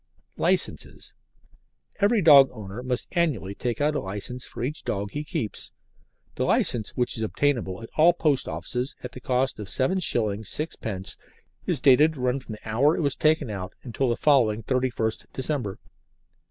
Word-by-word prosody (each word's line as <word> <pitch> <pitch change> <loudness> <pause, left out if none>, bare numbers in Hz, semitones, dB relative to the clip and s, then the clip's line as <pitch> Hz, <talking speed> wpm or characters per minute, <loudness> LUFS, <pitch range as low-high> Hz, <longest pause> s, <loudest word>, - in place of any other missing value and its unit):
LICENCES - - -1 0.9
Every 205 0 +3
dog 140 -4 +8
owner 105 0 -7
must 125 -1 -3
annually 150 - 0
take 120 +2 -3
out 150 +1 +2
a 145 - 0
licence 105 +4 -4
for - - -7
each 145 +5 -2
dog 100 0 -3
he 150 - -4
keeps. 110 -7 -4 0.6
The - - -2
licence, 110 -3 +2
which 125 -1 +1
is - - -2
obtainable 115 -4 -1
at 115 - -9
all 165 +3 +7
post 155 -5 0
offices 125 +2 -4
at 125 - -6
the 130 - -9
cost 125 0 0
of 105 - -6
7s. 130 - +1
6d., 110 - -1 0.5
is 160 -8 +1
dated 150 +3 +6
to 130 - -7
run 125 +2 +1
from 125 -4 -9
the 105 - -11
hour 135 +9 +3
it 160 - 0
is 140 - 0
taken 155 -6 +2
out 95 -2 -6
until 125 +1 -1
the 120 - 0
following 115 -7 +3
31st 125 -3 -1
December. 130 -7 -2
125 Hz, 165 wpm, -25 LUFS, 110-145 Hz, 0.9 s, dog